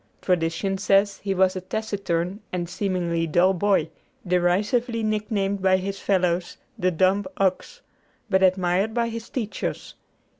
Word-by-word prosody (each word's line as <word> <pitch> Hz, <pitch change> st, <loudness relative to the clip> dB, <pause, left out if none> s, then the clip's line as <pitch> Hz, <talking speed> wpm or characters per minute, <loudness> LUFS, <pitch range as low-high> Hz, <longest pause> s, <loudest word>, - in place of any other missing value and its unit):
Tradition 180 Hz, +2 st, 0 dB
says 195 Hz, +1 st, +2 dB
he 195 Hz, -1 st, -2 dB
was 190 Hz, 0 st, +3 dB
a 185 Hz, -, -3 dB
taciturn 195 Hz, -2 st, -2 dB
and 175 Hz, -1 st, -2 dB
seemingly 175 Hz, -3 st, -1 dB
dull 175 Hz, +4 st, +3 dB
boy, 200 Hz, +2 st, +1 dB, 0.3 s
derisively 205 Hz, +7 st, +1 dB
nicknamed 210 Hz, -2 st, -1 dB
by 190 Hz, 0 st, +4 dB
his 195 Hz, +1 st, -4 dB
fellows 180 Hz, -2 st, 0 dB, 0.2 s
"the 185 Hz, -5 st, +1 dB
dumb 185 Hz, +3 st, +2 dB
ox," 195 Hz, -, -1 dB, 0.5 s
but 190 Hz, -3 st, +2 dB
admired 185 Hz, +3 st, +2 dB
by 235 Hz, -1 st, +1 dB
his 230 Hz, 0 st, -7 dB
teachers. 220 Hz, -5 st, -4 dB
190 Hz, 135 wpm, -24 LUFS, 180-205 Hz, 0.5 s, by